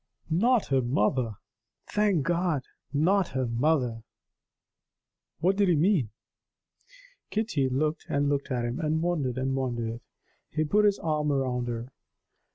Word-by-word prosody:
"Not 230 +7 +3
her 135 -1 +3
mother! 120 -1 0 0.5
Thank 205 -7 +1
God, 170 -3 0 0.3
not 175 +6 +3
her 130 -1 +1
mother!" 120 -1 +1 1.4
What 190 +3 +2
did 200 -2 +3
he 175 - +4
mean? 155 - +2 1.2
Kitty 180 - 0
looked 150 +4 -1
and 140 0 +1
looked 140 -1 -1
at 125 -3 -1
him, 120 +5 -3
and 160 0 0
wondered 145 -8 -1
and 135 +1 0
wondered. 120 -3 -2 0.5
He 155 - 0
put 210 +8 +3
his 205 -1 +3
arm 150 -2 0
round 125 -3 0
her. 120 +2 -4
145 Hz, 135 wpm, -28 LUFS, 125-175 Hz, 1.4 s, he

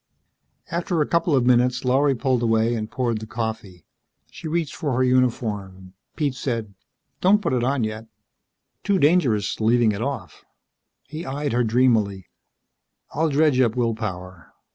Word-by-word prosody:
After 170 0 -1
a 150 - +3
couple 170 -2 +1
of 125 -2 +2
minutes, 125 +1 +2
Lorry 135 +2 +3
pulled 130 -1 0
away 115 0 +2
and 110 -2 -3
poured 120 -4 -1
the 110 - -8
coffee. 110 -6 -5 0.5
She - - -8
reached 165 -1 -2
for 145 -6 -3
her 130 - +2
uniform. 105 -7 -1 0.2
Pete 145 -4 -1
said, 115 -6 -4 0.5
"Don't 200 +3 +5
put 205 - -2
it 125 -2 0
on 130 -1 0
yet." 110 +1 -5 0.8
"Too 200 - +2
dangerous 140 - +2
leaving 115 0 +3
it 100 +1 -4
off." 135 -1 -5 0.6
He 155 +4 -8
eyed 145 0 -3
her 120 0 +2
dreamily. 110 -5 +1 0.9
"I'll 160 +1 0
dredge 145 -2 +3
up 115 -2 +2
will 120 -2 +1
power. 90 -5 -7
125 Hz, 155 wpm, -23 LUFS, 110-140 Hz, 0.9 s, Don't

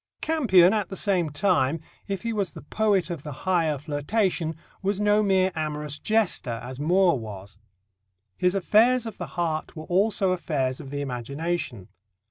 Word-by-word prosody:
Campion, 210 - +4
at 210 -5 -1
the 190 - -6
same 185 -6 +1
time, 160 -2 +1 0.3
if 195 0 -3
he 230 -1 -1
was 200 -3 -1
the - - -10
poet 200 -5 +1
of 165 -5 -4
the 150 - -7
higher 165 -5 +2
flirtation, 160 +4 -1 0.3
was 195 0 -1
no 210 0 +3
mere 190 -2 +3
amorous 150 -1 -3
jester, 200 - 0
as 130 +1 -7
Moore 175 0 +3
was. 100 -2 -9 0.8
His 180 - +1
affairs 225 +6 +4
of 225 - -7
the - - -4
heart 160 -2 -2
were 155 -1 -7
also 195 +1 +2
affairs 145 -8 -1
of 135 - -9
the 145 +1 -3
imagination. 140 - -3
175 Hz, 160 wpm, -25 LUFS, 145-200 Hz, 0.8 s, Campion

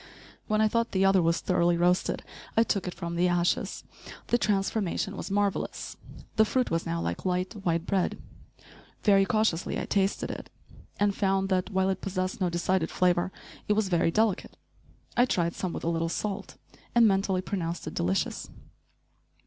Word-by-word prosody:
When 215 0 +2
I 220 - +5
thought 230 +2 0
the 190 0 +3
other 195 -1 +5
was 165 0 +1
thoroughly 175 -1 +2
roasted, 180 +1 +1 0.3
I 225 - +7
took 200 -5 -1
it 180 - -3
from 170 -1 -4
the 175 +1 +3
ashes. 175 0 0 0.5
The 240 - +3
transformation 200 -1 0
was - - -5
marvelous. 200 0 -1 0.4
The 220 - +7
fruit 250 +4 0
was 165 0 -1
now 85 - -1
like 85 +1 -3
light, 185 +1 -1
white 170 -1 0
bread. 190 -2 0 0.9
Very 195 -2 +5
cautiously 215 -6 0
I - - -3
tasted 195 0 0
it, - - -8 0.5
and 205 0 +3
found 195 -1 +1
that, 185 0 +1
while 190 -1 +1
it 190 - -4
possessed 185 -1 -3
no 180 - +2
decided 175 0 0
flavor, 180 0 +2 0.4
it 210 - +3
was 210 -2 +1
very 170 -2 +3
delicate. 215 +2 0 0.6
I 245 - +5
tried 170 -6 +1
some 185 - -3
with - - -5
a - - -2
little 165 0 0
salt, 200 +3 -4 0.4
and 235 -1 +7
mentally 195 -2 +1
pronounced 175 -3 -3
it 155 - -5
delicious. 90 +3 -1
190 Hz, 175 wpm, -28 LUFS, 175-200 Hz, 0.9 s, I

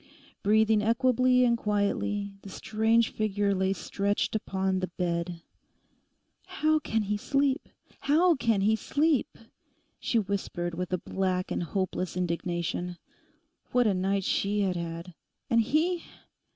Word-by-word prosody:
Breathing 215 +1 +4
equably 250 +3 +3
and 235 -1 +3
quietly, 205 -1 -1
the 200 - -10
strange 220 +3 +1
figure 205 -2 0
lay 190 0 +1
stretched 200 +2 -1
upon 190 -2 -1
the 185 - -2
bed. 170 -1 -3 1.0
'How 310 0 +1
can 225 -6 -1
he 210 +1 -1
sleep? 275 +5 0 0.3
How 335 +5 +4
can 230 -7 +1
he 215 +3 +3
sleep?' 290 +4 0 0.6
she 235 - 0
whispered 190 -4 -2
with 180 +1 -4
a 180 - +1
black 185 0 -2
and - - -1
hopeless 185 0 -2
indignation. 175 0 -2 0.8
What 245 -1 +4
a 210 - +3
night 195 +1 0
she 205 +2 0
had 190 -2 0
had! 170 +1 -5 0.4
And 230 0 +5
he! 325 +9 +1
205 Hz, 130 wpm, -28 LUFS, 185-230 Hz, 1.0 s, And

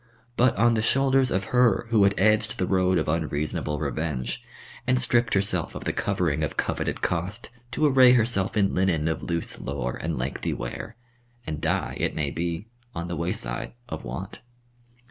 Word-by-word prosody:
But 125 0 +3
on 120 +3 +4
the 110 - +1
shoulders 135 +2 +3
of 95 -2 0
her 120 -5 +4
who 105 -3 +5
had 100 0 +3
edged 105 +2 +2
the 90 - 0
road 95 -1 +2
of 80 - 0
unreasonable 75 -1 -1
revenge, 70 -5 -3 0.4
and 125 0 +3
stripped 120 -3 +2
herself 95 -4 0
of - - -6
the - - -1
covering - - 0
of - - -3
coveted - - -2
cost 95 +8 -2 0.2
to 140 +6 0
array 130 -3 +7
herself 110 -5 +1
in 100 -2 +3
linen 85 -5 +1
of 80 - -1
loose 85 -1 -2
lore 65 -3 -3
and 80 -2 -2
lengthy 65 +3 -2
wear, - - -6 0.5
and 75 -1 -4
die, - - -1
it - - 0
may 75 -3 -1
be, 85 +4 -3 0.3
on 85 +1 -4
the 85 - -2
wayside 75 -7 -3 0.2
of - - -5
want. 70 +11 -6
95 Hz, 175 wpm, -26 LUFS, 80-115 Hz, 0.5 s, array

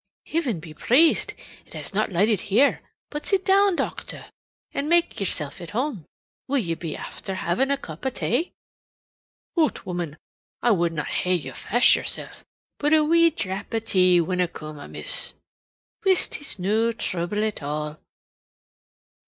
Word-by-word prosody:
"Hiven 275 - -1
be 160 -1 -10
praised 280 - +3 0.3
it - - -15
has - - -6
not 210 +1 +1
lighted 205 +3 +3
here! 255 +8 +4 0.3
But 295 0 -4
sit 390 -2 +2
down, 395 -1 +4
docther, - - -4 0.4
an' 285 +2 -2
make 345 0 +3
yersilf 155 -7 -2
at 170 - -7
home. 250 - -2 0.4
Will 280 +1 +1
ye 175 -10 0
be 165 -2 -5
afther 190 - -6
havin' 185 +9 0
a 280 - +2
cup 160 - -10
o' 265 - +1
tay?" 260 +5 -1 1.0
"Hoot, 320 -3 +1
woman! 175 -4 -4 0.5
I 240 - +5
would 170 -4 +2
na 155 -2 -2
hae 180 0 0
you 135 -7 -4
fash 240 - +4
yoursel', - - -3 0.5
but 295 +1 +2
a 310 - +5
wee 335 +2 +5
drap 200 - -4
tea 185 -4 +4
winna 180 +1 +1
coom 155 -3 -9
amiss." - - 0 0.7
"Whist! 375 -5 +2
It's 285 - -3
no 215 +5 +2
thruble 205 -2 -1
at 215 -5 -3
all." 150 +1 -4
205 Hz, 155 wpm, -24 LUFS, 170-285 Hz, 1.0 s, I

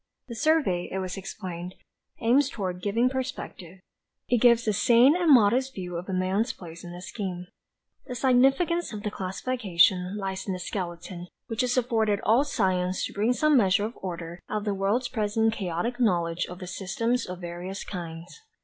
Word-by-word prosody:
"The - - -5
survey," 280 - +1
it - - -2
was 185 -1 -3
explained, 185 -2 -7 0.5
"aims 260 +5 +4
toward 185 -6 -4
giving 225 +6 +2
perspective. 255 - -5 0.5
It 245 -3 +2
gives 235 -1 +5
a 215 - +3
sane 240 - +5
and 350 -3 +3
modest 255 +2 +4
view 180 -2 -5
of 175 +3 -5
man's 190 +5 0
place 170 -2 -11
in 175 - -8
the 175 +1 -9
scheme. 185 -4 -5 0.6
"The 250 - -5
significance 270 +7 +3
of 205 -1 -6
the 210 - -2
classification 190 -2 +1
lies 190 -1 -4
in 190 - -1
the 185 - -4
skeleton 175 -1 -5 0.2
which 225 +1 -2
is 250 0 0
afforded 225 -4 +1
all 235 +6 +4
science 185 -9 0
to - - -7
bring 215 +5 +2
some 305 +3 +3
measure 205 -4 +4
of 225 - -5
order 170 -2 -6
out 215 - -1
of - - -8
the 205 - 0
world's 200 +6 0
present 220 -1 +1
chaotic 200 +5 -3
knowledge 175 -6 +1
of 180 - -8
the 185 - -7
systems 210 +7 -1
of 180 0 -7
various 175 +3 -6
kinds. 170 - -8
200 Hz, 175 wpm, -27 LUFS, 180-245 Hz, 0.6 s, gives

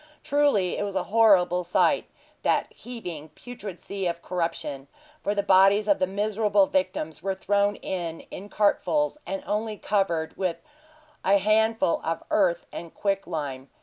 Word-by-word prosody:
Truly 285 -11 +2
it - - 0
was 200 -1 -4
a - - +1
horrible 185 -6 +5
sight, 175 - +2 0.4
that - - 0
heaving, 175 -11 -8
putrid 210 -7 -9
sea 195 -2 -4
of 170 0 -4
corruption; 165 -6 -3 0.3
for 205 - -1
the 200 - +1
bodies 195 +3 +5
of 200 - +3
the 185 - +2
miserable 205 0 +2
victims 185 -5 -2
were 195 +1 -2
thrown 205 +1 +1
in 170 -3 -4
in 200 +3 -8
cartfuls, 295 +9 +1
and 195 0 -4
only 215 +1 -2
covered 180 -7 -1
with 180 -3 -1 0.7
a 200 +1 +5
handful 215 -1 +2
of 165 +1 -2
earth 180 -5 +2
and 170 -1 -8
quicklime. 155 -9 -3
195 Hz, 150 wpm, -26 LUFS, 175-210 Hz, 0.7 s, horrible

